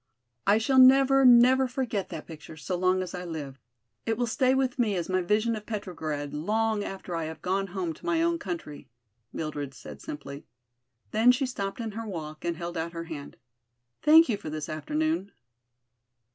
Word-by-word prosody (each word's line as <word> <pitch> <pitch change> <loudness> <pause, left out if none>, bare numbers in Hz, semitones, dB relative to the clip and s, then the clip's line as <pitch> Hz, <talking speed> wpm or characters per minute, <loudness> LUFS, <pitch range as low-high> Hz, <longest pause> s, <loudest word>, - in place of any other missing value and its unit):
"I 205 +2 +6
shall 260 +4 +3
never, 270 +1 +7
never 255 +2 +7
forget 245 -6 -3
that 155 - -7
picture 155 -1 -11
so 170 +5 -3
long 185 +1 +2
as 180 - -8
I 180 -1 -5
live. 150 -6 -6 0.4
It 225 -1 -1
will 245 - +1
stay 255 +3 +2
with 260 -1 0
me 215 -5 +2
as 175 -1 -3
my 185 0 +1
vision 215 +5 +1
of 210 -1 -8
Petrograd 160 -9 -4
long 215 +6 0
after 190 -3 -6
I 165 -1 -2
have 160 0 -8
gone 195 +2 0
home 180 -3 -3
to - - -15
my 330 0 +2
own 340 0 +1
country," 170 - -6 0.4
Mildred 145 -3 -5
said - - -11
simply. 140 -1 -8 0.6
Then 225 +3 +5
she 250 +2 0
stopped 200 -6 -4
in 225 -2 -3
her 225 +2 -6
walk 155 -5 -7
and 170 -1 -2
held 170 0 -5
out 165 +1 -3
her 165 0 -5
hand. 155 -4 -8 0.6
"Thank 320 +2 +7
you 225 -5 0
for 200 - -7
this 155 -1 -5
afternoon." 300 - -2
195 Hz, 185 wpm, -27 LUFS, 160-245 Hz, 0.6 s, never